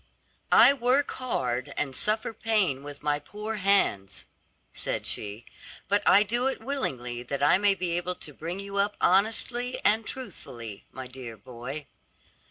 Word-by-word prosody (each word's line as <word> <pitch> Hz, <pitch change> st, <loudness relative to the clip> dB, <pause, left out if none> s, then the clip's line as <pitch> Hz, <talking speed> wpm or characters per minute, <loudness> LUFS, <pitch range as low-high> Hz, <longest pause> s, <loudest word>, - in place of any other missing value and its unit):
"I 275 Hz, -, +8 dB
work 265 Hz, +2 st, +2 dB
hard 125 Hz, -, -2 dB
and 135 Hz, -3 st, -1 dB
suffer 215 Hz, -, +1 dB
pain 210 Hz, -, +1 dB
with 145 Hz, 0 st, -10 dB
my 150 Hz, -1 st, +1 dB
poor 210 Hz, +8 st, -6 dB
hands," 185 Hz, -, +2 dB, 0.5 s
said -, -, -3 dB
she, 105 Hz, +3 st, -1 dB, 0.4 s
"but 205 Hz, +1 st, +3 dB
I 205 Hz, -, +7 dB
do 240 Hz, +5 st, 0 dB
it 270 Hz, -, -2 dB
willingly, 125 Hz, -, -2 dB
that 140 Hz, +3 st, -3 dB
I 160 Hz, +6 st, +5 dB
may 205 Hz, -1 st, +4 dB
be 180 Hz, -2 st, -2 dB
able 180 Hz, +1 st, -2 dB
to 150 Hz, -, -8 dB
bring 170 Hz, +6 st, -5 dB
you 200 Hz, 0 st, -5 dB
up 205 Hz, +1 st, +1 dB
honestly 225 Hz, +6 st, +1 dB
and 220 Hz, +2 st, +4 dB
truthfully, 125 Hz, -, -8 dB
my 130 Hz, -, -7 dB
dear 125 Hz, -3 st, -9 dB
boy." 125 Hz, +7 st, -7 dB
180 Hz, 155 wpm, -27 LUFS, 130-215 Hz, 0.5 s, I